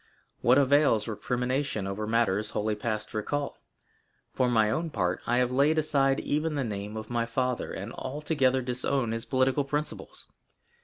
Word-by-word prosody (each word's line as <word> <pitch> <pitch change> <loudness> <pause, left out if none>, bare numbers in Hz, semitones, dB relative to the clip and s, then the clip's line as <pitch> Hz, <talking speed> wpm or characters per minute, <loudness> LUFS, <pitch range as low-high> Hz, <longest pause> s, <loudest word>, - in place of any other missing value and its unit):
What 125 +2 +5
avails 140 -5 +4
recrimination 125 0 -1
over 100 +2 -3
matters 110 -2 +1
wholly 105 +1 -1
past 110 +1 -3
recall? 140 +7 -3 0.7
For 125 -1 +2
my 110 -3 +3
own 165 +8 -1
part, 90 - -1
I 120 - +2
have 125 0 +2
laid 145 +5 +3
aside 140 -3 +2
even 150 +1 -1
the 140 - 0
name 105 -1 -5
of 110 +1 -7
my 115 -1 0
father, 125 +1 -1
and 100 +4 -6
altogether 130 -2 0
disown 125 0 0
his 115 +1 -3
political 130 +2 +2
principles. 150 +2 -4
125 Hz, 155 wpm, -28 LUFS, 110-140 Hz, 0.7 s, What